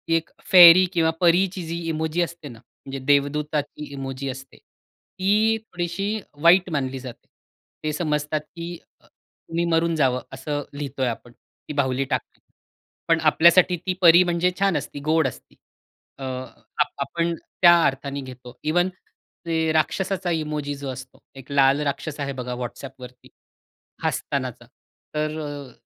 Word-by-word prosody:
एक 165 - -1 0.2
फेरी 180 0 +10
किंवा 165 -2 +3
परीची 180 +1 +3
जी 170 +1 -3
इमोजी 160 +2 -1
असते 170 -3 -4
ना 115 -2 -12
म्हणजे 135 +2 -10
देवदूताची 145 +1 0
इमोजी 135 0 -5
असते 135 +1 -9
ती 215 - -1
थोडीशी 195 +1 -3 0.2
वाईट 180 +2 +5
मानली 135 -3 -2
जाते. 125 -2 -10 0.6
ते 155 - -1
समजतात, 150 -1 -1
की 170 +2 -8 0.3
तुम्ही 170 +1 -6
मरून 165 0 +2
जावं 130 -4 +1
असं 145 -1 -3
लिहितोय 140 -3 -3
आपण 120 +1 -5
ती 150 - -13
बाहुली 135 -2 0
टाकली. - - -4 0.7
पण 165 -1 +3
आपल्यासाठी 170 +3 +5
ती 185 - 0
परी 170 +1 +8
म्हणजे 175 +1 +1
छान 195 -5 +2
असती 145 0 -6
गोड 160 -2 +3
असती. - - -10 0.6
अ, - - -7
आ 130 +3 -3 0.2
आपण 170 +4 -2
त्या 175 +1 +4
अर्थाने 140 +1 -2
घेतो. 125 -1 -11
इव्हन 175 +4 +2 0.6
ते 160 -1 0
राक्षसाचा 185 +3 0
इमोजी 150 -3 -2
जो 140 -1 -6
असतो 130 +1 -9 0.2
एक 135 +2 -13
लाल 140 0 +4
राक्षस 150 +1 -5
आहे 140 -1 -3
बघा 125 0 -4
WhatsAppवरती 125 0 -10 0.7
हसतानाचा - - -3 0.5
तर 155 +1 -1
अ, 145 -3 -7
155 Hz, 135 wpm, -23 LUFS, 135-170 Hz, 0.7 s, फेरी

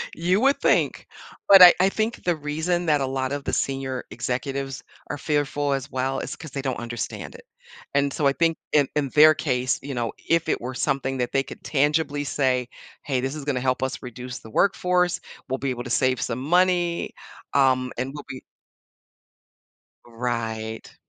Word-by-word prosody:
You 180 +4 +1
would 275 +1 +3
think, - - +2 0.4
but 195 -1 +10
I 180 -1 +12
I 190 +1 +4
think 220 +3 -2
the 175 -2 +1
reason 160 +4 -2
that 150 -2 +3
a - - +1
lot 130 0 -2
of 145 -1 -4
the - - -2
senior 135 -2 -2
executives 135 +2 -3 0.3
are 145 - -3
fearful 145 -1 0
as 135 +1 -3
well 130 +1 -1
is - - -5
'cause 160 -4 -10
they 140 - -4
don't 130 -3 -3
understand 120 0 -5
it. - - -13 0.5
And 140 0 +2
so 150 - -1
I - - +4
think 165 +1 +1 0.2
in 145 -3 +4
in 140 -3 0
their 155 +2 +7
case, 130 -4 -1
you 140 0 -5
know, 120 -2 -2 0.2
if 165 0 +2
it - - 0
were 125 +2 -5
something 135 -1 -1
that 125 -1 -2
they 135 0 +2
could - - -11
tangibly 145 0 +1
say, 130 -3 0 0.3
"Hey, 135 -3 -1
this 135 +3 -3
is 150 - -6
gonna 135 -4 0
help 130 0 0
us 130 - -3
reduce 125 0 -7
the 110 - -13
workforce, 180 - +2 0.3
we'll 130 - -1
be 135 - -2
able 120 -1 -4
to - - -6
save 130 +1 +1
some 125 +3 -3
money, 175 +2 +1 0.4
um, 130 -2 +3
and 130 +3 -3
we'll 145 - -8
be" 130 - -7 1.6
Right. 115 -2 -4
135 Hz, 190 wpm, -24 LUFS, 130-155 Hz, 1.6 s, I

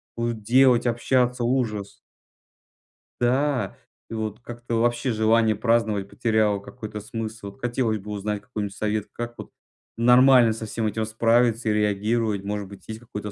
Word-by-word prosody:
будет, 115 -2 -3
делать, 125 +1 +4
общаться. 125 +1 +1
Ужас! 115 -5 -1 1.2
Да, 130 +2 0 0.3
и - - -7
вот 110 -1 -4
как-то 120 0 -5
вообще 120 +2 +1
желание 110 0 +3
праздновать 110 -4 +1
потеряло 110 -3 +1
какой-то 105 +1 -8
смысл. 110 -2 -6
Хотелось 120 -3 -1
бы 105 +2 -9
узнать 105 0 -3
какой-нибудь 105 -3 -5
совет. 105 -1 -2
Как 120 0 -6
вот - - -9 0.5
нормально 125 0 +6
со 110 0 -6
всем 110 0 -2
этим 110 +1 -2
справиться 115 +1 +2
и - - +2
реагировать? 105 0 0
Может 100 -1 -4
быть 100 0 -14
есть 110 0 -6
какой-то 105 -4 -7
110 Hz, 145 wpm, -24 LUFS, 105-120 Hz, 1.2 s, нормально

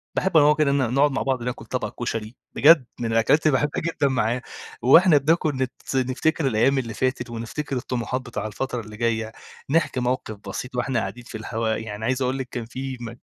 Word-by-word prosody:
باحب 190 -3 +2
أنا 145 - +7
وهو 150 0 +5
كده 150 -2 +2
نقعُد 140 +2 +2
مع 135 - -1
بعض 130 -3 -1
ناكل 125 0 -4
طبَق 125 - -3
كُشري، 115 0 -4 0.2
بجد، 150 -3 +6
من 115 -1 -2
الأكلات 115 +8 +3
اللي 155 - +5
باحبها 150 +1 -1
جدًا 160 -3 0
معاه، 125 -2 0 0.4
وإحنا 160 +5 +7
بناكل 155 0 +2
نت 130 -1 -2 0.2
نفتكر 135 +4 +1
الأيام 130 +3 +3
اللي 115 -3 -2
فاتت 130 +1 -1
ونفتكر 120 +5 -4
الطموحات 125 +1 -2
بتاع 120 -4 -5
الفترة 120 +3 -3
اللي 105 0 -11
جاية، 115 -1 -1 0.4
نحكي 155 -4 +1
موقِف 125 -4 -2
بسيط 125 +5 -6
وإحنا 125 0 0
قاعدين 120 +2 -5
في 115 - -8
الهوا، 110 0 -2
يعني 110 0 -5
عايز 130 +1 0
أقول 130 +1 0
لِك 130 -1 -5
كان 120 -2 -4
في 130 +2 -6
م 115 -1 -7
125 Hz, 200 wpm, -24 LUFS, 115-140 Hz, 0.4 s, أنا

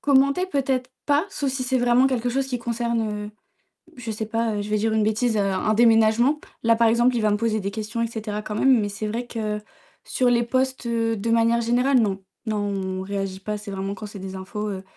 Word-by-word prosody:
Commenter 280 +5 +3
peut-être 265 -5 -1
pas 290 +4 +2
sauf 280 -7 -2
si 260 0 -3
c'est 255 0 +1
vraiment 245 +2 +4
quelque 245 -2 0
chose 270 +2 0
qui 250 -2 -3
concerne, 230 -3 -2
heu, - - -9 0.7
je 235 -2 -5
sais 220 0 -4
pas, 225 0 0
heu, 205 - -1
je 205 - -6
vais 215 - +2
dire 220 +1 0
une 220 -1 +2
bêtise, 220 +1 +1
un 200 +1 +1
déménagement. 230 +5 +4 0.2
Là 230 0 +5
par 230 0 +4
exemple 240 +2 +3
il 230 - +1
va 210 -1 +2
me 205 - +2
poser 220 0 0
des 200 0 -3
questions 220 +2 -4
et 230 - +1
cetera 215 -2 -4
quand 210 - -5
même 260 +2 +4
mais 205 -1 -1
c'est 210 +2 -4
vrai 230 +3 -3
que 215 -3 -3 0.4
sur 250 -1 +1
les 240 -1 +3
posts, 260 +1 -1
heu, 230 -1 0
de 225 +4 -3
manière 230 0 +3
générale, 245 +3 +3
non. 195 -3 0 0.2
Non, 215 -1 -1
on 195 -2 -2
réagit 195 -1 -4
pas 210 +2 -4
c'est 205 0 -8
vraiment 195 +1 -3
quand 210 - -8
c'est 205 -1 -9
des 190 0 -7
infos, 210 +3 -4
heu, 190 -2 -5
225 Hz, 235 wpm, -24 LUFS, 210-245 Hz, 0.7 s, Là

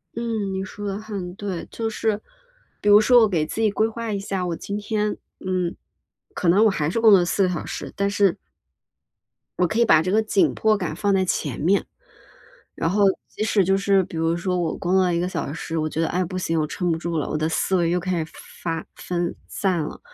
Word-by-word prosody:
嗯， 225 -4 -2
你 190 0 -2
说 205 +1 -8
得 195 - -2
很 200 -5 -6
对。 195 -4 -4
就 225 -1 -2
是， 215 -1 -1 0.6
比 205 - +2
如 205 +1 +9
说 245 +2 +6
我 220 - +5
给 165 -5 +1
自 220 - -4
己 215 -2 +3
规 215 +2 +2
划 230 0 -5
一 200 - -1
下， 195 -2 -3
我 175 -2 -2
今 200 - -4
天， 210 0 -1 0.3
嗯， 185 -2 -1 0.6
可 175 - 0
能 205 +5 +5
我 - - +6
还 155 -6 -1
是 230 - -1
工 225 -1 +6
作 190 -3 +7
4 180 +3 +1
个 185 - +2
小 175 - -3
时， - - -6
但 200 0 0
是 200 -3 +2 1.2
我 180 - +3
可 215 - -1
以 235 - +5
把 155 - +6
这 185 +3 -1
个 215 +2 +4
紧 215 -3 +2
迫 215 -1 +2
感 180 -6 -3
放 200 +3 +1
在 190 -1 +3
前 145 -8 -2
面。 190 +6 +2 0.9
然 - - -1
后 205 +2 +3 0.2
即 - - -6
使 215 -3 +3
就 195 +2 +3
是 195 0 +3
比 170 - -9
如 165 +1 +1
说， 180 +1 -1
我 170 -3 -1
工 175 - -2
作 190 - +5
了 180 -1 +1
1 170 - +1
个 180 - -1
小 145 - -3
时， 165 +1 -5
我 155 0 0
觉 155 - -3
得： 165 - +1
唉， 180 +1 0
不 185 +2 -4
行 165 -2 -1
我 155 - +1
撑 175 +3 -2
不 165 - +1
住 170 0 -2
了， 150 - -2
我 - - -1
的 155 +1 0
思 190 +3 +1
维 170 -2 +2
又 180 +1 +1
开 175 -2 -1
始 160 - -15 0.3
发 165 -2 -2
分 175 -1 -3
散 185 -4 -1
了。 150 - -6
185 Hz, 255 characters per minute, -23 LUFS, 170-205 Hz, 1.2 s, 如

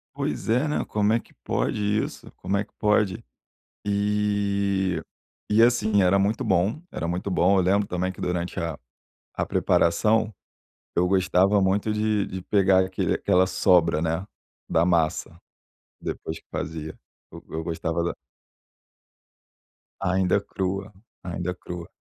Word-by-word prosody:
Pois - - -3
é, 125 +7 +2
né, 150 - 0
como 105 0 +1
é 115 - +3
que - - -19
pode - - -1
isso? 105 +1 -2
Como 100 +1 -1
é 100 - 0
que 105 - -23
pode? 105 -3 +2 0.6
E 100 -2 0 0.5
e, 110 +2 +6
assim, 110 -4 +3
era 95 +2 +4
muito 100 +3 +1
bom, 95 - +1
era 85 - -3
muito 90 +3 -2
bom. 90 +2 +3
Eu 95 - +3
lembro, 100 +2 +2
também, 90 +1 -1
que - - -11
durante 90 -1 -2
a 85 -3 -3 0.6
a - - 0
preparação, 110 +6 +2 0.6
eu 90 +1 +3
gostava 95 +2 +3
muito 100 +3 +1
de 105 -1 +1
de 95 - -6
pegar 95 -2 +4
aquele 95 - -1
aquela 95 -2 +3
sobra, 90 -4 +3
né, 80 +3 -1 0.4
da 80 +1 +3
massa, 85 -3 0 0.6
depois 80 +1 -5
que - - -27
fazia. 80 -1 -5 0.3
Eu - - -11
eu 80 - -3
gostava 85 0 -2
da 85 - -2 1.8
Ainda 95 0 +2
crua. 95 +1 -3 0.3
Ainda 90 0 -3
crua. 85 -2 -8
95 Hz, 140 wpm, -25 LUFS, 90-105 Hz, 1.8 s, e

